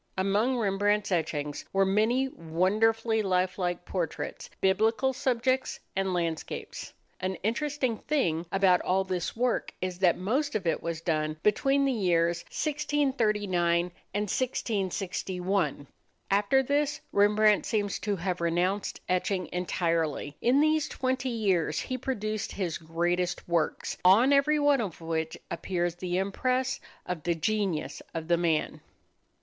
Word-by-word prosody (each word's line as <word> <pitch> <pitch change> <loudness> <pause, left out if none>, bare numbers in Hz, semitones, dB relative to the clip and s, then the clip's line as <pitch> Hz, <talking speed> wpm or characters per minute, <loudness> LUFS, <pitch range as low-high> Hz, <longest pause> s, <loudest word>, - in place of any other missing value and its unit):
Among 205 +7 +2
Rembrandt's 205 -1 +1
etchings 150 -4 -1
were 195 0 +3
many 220 +7 +2
wonderfully 220 +5 +1
life 185 -1 0
like 175 -1 -2
portraits, 175 -5 -4
biblical 225 +7 +2
subjects, 255 +1 0 0.2
and 190 0 0
landscapes. 170 -3 -3 0.3
An 185 0 -2
interesting 255 +1 -1
thing 175 - 0
about 190 -2 +4
all 190 +1 +1
this 185 -2 -3
work 245 0 0
is 185 -1 -4
that 180 -3 +4
most 265 +11 -1
of 210 - -1
it 165 - 0
was 170 -1 -4
done 155 -2 -1
between 270 +6 +3
the 270 - +2
years 170 -6 +2
1639 215 - 0 0.2
and 205 - -1
1661. 190 - -1 0.5
After 205 +7 +3
this 290 +2 0
Rembrandt 210 +1 +4
seems 205 -4 -1
to 205 -1 -1
have 180 0 -3
renounced 180 +4 0
etching 185 0 0
entirely. 165 -5 -1
In 260 +4 +4
these 310 0 +2
twenty 260 0 -1
years 200 -8 +1
he 255 - -3
produced 215 -5 -3
his 180 -5 -2
greatest 175 +2 -1
works, 170 -3 -1
on 220 +10 +6
every 280 +2 +4
one 290 -3 +3
of 195 -7 -5
which 160 -1 -3
appears 175 -2 -1
the 175 +1 -3
impress 255 +7 0 0.3
of 180 -3 -4
the 170 +2 0
genius 195 -1 -1
of 160 -1 -4
the 170 - +4
man. 165 -3 0
195 Hz, 135 wpm, -28 LUFS, 175-235 Hz, 0.5 s, on